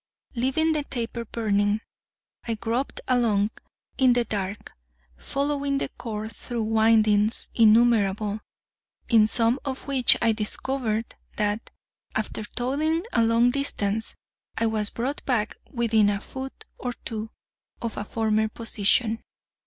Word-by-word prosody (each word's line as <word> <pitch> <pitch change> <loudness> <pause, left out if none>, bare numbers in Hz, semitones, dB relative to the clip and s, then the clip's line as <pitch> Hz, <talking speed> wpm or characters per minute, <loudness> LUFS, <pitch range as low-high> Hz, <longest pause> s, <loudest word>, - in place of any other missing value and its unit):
Leaving 270 +6 +1
the 305 -2 0
taper 235 -3 -4
burning, 205 -2 +1 0.7
I 230 - 0
groped 235 +5 -2
along 220 -5 +2 0.5
in 260 -2 +6
the 240 -1 +1
dark, 205 -1 -4 0.4
following 280 - -1
the - - -2
cord 220 -1 -6
through 240 -2 -4
windings 220 -1 +3
innumerable, 215 -2 +4 0.7
in 220 -3 +6
some 230 +3 +1
of 270 -2 -4
which 270 -3 +4
I 230 -1 +3
discovered 225 +1 -2 0.2
that, 210 +1 -1 0.5
after 215 0 -2
toiling 300 +9 -1
a 230 - +4
long 230 +2 +4
distance, 225 -6 -1 0.4
I 230 - +1
was 215 -2 +1
brought 260 +5 -3
back 225 -5 0
within 225 -4 +3
a 200 -1 0
foot 265 +5 -8
or 245 -1 -3
two 220 -1 -3 0.5
of 230 -2 -4
a - - -3
former 220 0 +1
position. 225 +1 +1
230 Hz, 125 wpm, -25 LUFS, 215-250 Hz, 0.7 s, in